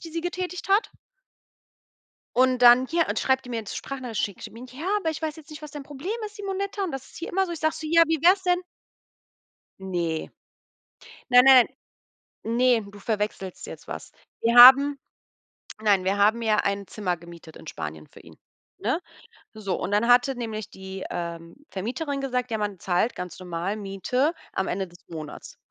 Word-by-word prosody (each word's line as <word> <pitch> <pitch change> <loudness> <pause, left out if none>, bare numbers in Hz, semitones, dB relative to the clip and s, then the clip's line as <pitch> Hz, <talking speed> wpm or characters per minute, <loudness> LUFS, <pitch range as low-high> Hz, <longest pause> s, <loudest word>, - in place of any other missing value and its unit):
die 330 - -9
sie 330 +1 -3
getätigt 360 +1 -4
hat. 400 +4 +3 1.5
Und 255 0 +4
dann 245 +2 +8
hier 335 0 +1
und - - -1
schreibt 265 0 +1
die 250 - -11
mir 235 - -3
jetzt 215 - -9
'n - - -4
Sprachnachricht 255 -5 -5
schickt 200 - -8
die - - -13
mir: 235 +3 -11
„Ja, 290 +6 -8
aber 325 -5 -1
ich 315 - -7
weiß 310 -1 -3
jetzt 315 0 -14
nicht, 305 0 -10
was 300 - -8
dein 290 -2 -8
Problem 290 +6 -7 0.2
ist, 420 - -12
Simonetta. 400 0 -3
Und 375 - -2
das 270 -3 -6
ist - - -17
hier 335 - -6
immer 385 +1 +1
so.” 345 - -5
Ich 330 - -6
sage 315 0 +1
so: 315 - -6
„Ja, 335 +1 +6
wie 325 0 +1
wär's 370 +3 +5
denn?” 360 -1 +2 1.2
Ne. 170 -4 -2 1.0
Nein, 250 0 +8
nein. 260 -3 +8 0.8
Ne, 240 +1 +3
du 205 - -13
verwechselst 210 -3 -3
jetzt - - -11
was. - - -7 0.3
Wir 230 +1 +2
haben 275 +3 +9 0.8
nein, 200 -4 +3
wir 195 +2 0
haben 215 +3 +3
ja 220 -2 +2
ein 200 0 -1
Zimmer 185 -4 -2
gemietet 170 -1 -13
in - - -13
Spanien 75 - -7
für - - -16
ihn, - - -16 0.4
ne? - - -1 0.5
So 205 -3 -4
und - - -3
dann 210 +3 +2
hatte 245 +2 +5
nämlich 220 -4 -5
die, 190 0 -8
ähm, 170 +1 -6
Vermieterin 260 - -4
gesagt: 250 -2 -2
„Ja, 220 - -1
man 205 -2 -3
zahlt 185 +7 0
ganz 180 -1 -7
normal 180 +2 -3
Miete 215 - -1 0.2
am 190 - -1
Ende 190 +1 -2
des 175 0 -17
Monats”, 155 -3 -9
240 Hz, 190 wpm, -25 LUFS, 195-300 Hz, 1.5 s, haben